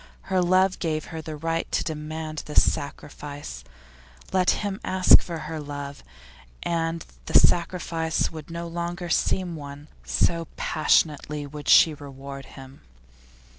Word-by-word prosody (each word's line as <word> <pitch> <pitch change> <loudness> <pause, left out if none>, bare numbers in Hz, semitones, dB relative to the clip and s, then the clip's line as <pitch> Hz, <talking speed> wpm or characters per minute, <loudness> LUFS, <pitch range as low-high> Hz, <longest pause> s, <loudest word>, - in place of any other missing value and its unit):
Her 185 - +4
love 185 +1 +3
gave 155 -2 -1
her 160 - -4
the 155 0 -6
right 165 +2 -2
to - - +1
demand 155 0 -4
this 150 - +4
sacrifice; 145 - -5 0.7
let 185 -1 +3 0.2
him 200 0 -3
ask 185 -1 +6
for 170 -2 -5
her 155 +1 -5
love, 145 -1 -7 0.6
and 165 -1 -1 0.2
the - - -4
sacrifice 170 -2 +2
would 155 -2 -9
no 170 0 -5
longer 175 +1 -4
seem 175 +1 +1
one, 145 0 -9
so 165 - +1
passionately 150 -1 +1
would 145 +1 -7
she 160 - +8
reward 140 -1 -9
him. 135 0 -12
160 Hz, 135 wpm, -25 LUFS, 145-170 Hz, 0.7 s, she